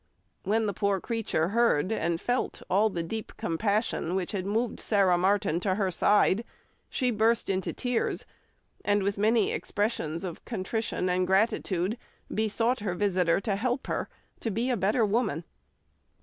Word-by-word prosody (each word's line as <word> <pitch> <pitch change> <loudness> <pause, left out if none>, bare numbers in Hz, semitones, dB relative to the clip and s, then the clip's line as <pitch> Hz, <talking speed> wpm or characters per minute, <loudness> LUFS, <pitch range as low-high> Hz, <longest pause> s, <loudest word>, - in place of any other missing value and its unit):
When 220 +3 +1
the 205 - -1
poor 200 +1 +1
creature 215 -7 -1
heard 220 -6 +2
and 170 -5 0
felt 245 +6 -2
all 205 +4 +4
the 175 -4 -3
deep 220 +6 -5
compassion 200 0 0
which 185 -2 -1
had 195 -2 -3
moved 225 +3 -1
Sarah 195 -4 +3
Martin 190 -1 +2
to 185 0 0
her 195 -2 0
side, 205 +3 +3 0.5
she 250 -1 0
burst 220 -1 +2
into 190 -1 -1
tears, 245 -2 -1 0.6
and 205 -1 +2
with 200 +1 -1
many 220 +1 +3
expressions 180 -6 -2
of 175 -3 -6
contrition 220 -2 -2
and 180 0 +1
gratitude 190 +1 +1 0.3
besought 225 +3 +1
her 200 -4 -2
visitor 180 -3 +2
to 200 -1 -1
help 245 +5 -1
her - - -2 0.3
to 230 - -2
be 230 +5 0
a - - +2
better 210 +3 +2
woman. 205 - 0
205 Hz, 155 wpm, -28 LUFS, 185-225 Hz, 0.6 s, all